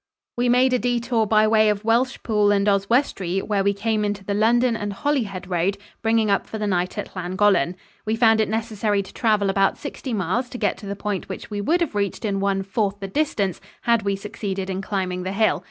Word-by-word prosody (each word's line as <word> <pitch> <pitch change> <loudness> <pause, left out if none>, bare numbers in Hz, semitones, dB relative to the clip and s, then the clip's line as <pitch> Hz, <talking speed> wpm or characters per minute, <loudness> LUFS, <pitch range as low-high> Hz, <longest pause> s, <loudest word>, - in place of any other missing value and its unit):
We 245 0 +1
made 255 +1 +4
a 250 - +3
detour 240 -2 0
by 215 0 +4
way 215 0 +4
of 210 0 -1
Welshpool 225 -3 +2
and 200 0 +2
Oswestry, 200 -2 +1
where 205 -2 0
we 200 0 +1
came 215 +1 0
into 205 -1 -2
the 200 - -1
London 235 +3 +3
and 205 -2 -3
Holyhead 200 -6 -2
road, 180 +2 0 0.2
bringing 225 -2 +2
up 195 - +1
for 220 - -5
the 210 - -2
night 185 0 -1
at 205 - -6
Llangollen. 185 0 +1 0.3
We 215 +1 -1
found 225 -1 +4
it 215 - 0
necessary 215 -2 -1
to 190 - -14
travel 215 -3 +2
about 195 0 +2
sixty 280 -2 -6
miles 220 +4 -1
to 245 - -7
get - - 0
to 205 - -9
the 200 - -3
point 200 -2 -4
which - - -7
we 205 -1 -2
would 335 - +1
have 335 - 0
reached 205 +2 -2
in 200 -2 0
one 195 0 0
fourth 200 0 -1
the 195 - -5
distance 200 - -1 0.2
had 235 -1 +3
we 200 -1 0
succeeded 195 -1 -4
in 190 +1 -3
climbing 190 -2 -2
the 185 +1 -3
hill. 215 +1 +2
205 Hz, 220 wpm, -23 LUFS, 195-225 Hz, 0.3 s, made